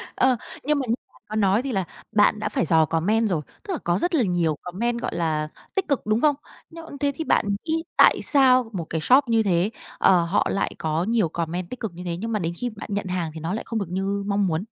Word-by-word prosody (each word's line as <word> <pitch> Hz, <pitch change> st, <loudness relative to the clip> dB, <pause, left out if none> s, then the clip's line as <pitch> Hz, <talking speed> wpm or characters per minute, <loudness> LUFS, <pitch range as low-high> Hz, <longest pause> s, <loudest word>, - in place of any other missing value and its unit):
Ờ, 255 Hz, -2 st, +3 dB, 0.3 s
nhưng 300 Hz, +1 st, +1 dB
mà 265 Hz, -, -2 dB
như 225 Hz, -, +2 dB, 0.2 s
bạn -, -, -23 dB
có 215 Hz, -, -4 dB
nói 205 Hz, +1 st, +3 dB
thì 270 Hz, -, -4 dB
là 195 Hz, -5 st, 0 dB, 0.3 s
bạn 210 Hz, 0 st, +3 dB
đã 210 Hz, -, -2 dB
phải 210 Hz, -, 0 dB
dò 160 Hz, 0 st, +4 dB
comment 205 Hz, +8 st, +1 dB
rồi, 165 Hz, -4 st, 0 dB, 0.2 s
tức 400 Hz, -3 st, -4 dB
là -, -, -1 dB
có 175 Hz, 0 st, +1 dB
rất 350 Hz, -1 st, 0 dB
là 265 Hz, -, +3 dB
nhiều 175 Hz, -5 st, +1 dB
comment, 235 Hz, +7 st, -2 dB
gọi -, -, -3 dB
là, 155 Hz, -3 st, 0 dB, 0.3 s
tích 390 Hz, -1 st, 0 dB
cực, 280 Hz, -7 st, 0 dB
đúng 215 Hz, +2 st, +1 dB
không? 295 Hz, -2 st, +4 dB, 0.3 s
Nhưng 330 Hz, -3 st, -10 dB
thế 285 Hz, 0 st, +1 dB
thì 320 Hz, -, -3 dB
bạn -, -, +2 dB, 0.2 s
nghĩ 325 Hz, 0 st, -1 dB
tại -, -, +6 dB
sao 255 Hz, -4 st, +4 dB
một 170 Hz, -4 st, -3 dB
cái 160 Hz, -, -2 dB
shop 260 Hz, -, +5 dB
như 225 Hz, -1 st, +3 dB
thế, 185 Hz, 0 st, +2 dB, 0.3 s
ờ, 180 Hz, -3 st, +4 dB
họ 170 Hz, +4 st, +1 dB
lại 195 Hz, -, 0 dB
có 160 Hz, +1 st, -1 dB
nhiều 215 Hz, -4 st, +1 dB
comment 170 Hz, +2 st, -3 dB
tích 255 Hz, -, -7 dB
cực 220 Hz, -7 st, -4 dB
như 180 Hz, -, -8 dB
thế, 170 Hz, -1 st, -3 dB
nhưng 225 Hz, +4 st, -4 dB
mà 215 Hz, -, 0 dB
đến 170 Hz, -2 st, -2 dB
khi 245 Hz, -, -2 dB
bạn 215 Hz, -1 st, -10 dB
nhận 200 Hz, -1 st, -2 dB
hàng 180 Hz, -3 st, -2 dB
thì 160 Hz, -, -7 dB
nó 165 Hz, +3 st, -3 dB
lại 220 Hz, -, -3 dB
không 225 Hz, -2 st, -2 dB
được 195 Hz, -, -4 dB
như 195 Hz, +2 st, -2 dB
mong 200 Hz, -1 st, +1 dB
muốn? 165 Hz, +1 st, -1 dB
205 Hz, 265 wpm, -24 LUFS, 175-245 Hz, 0.3 s, tại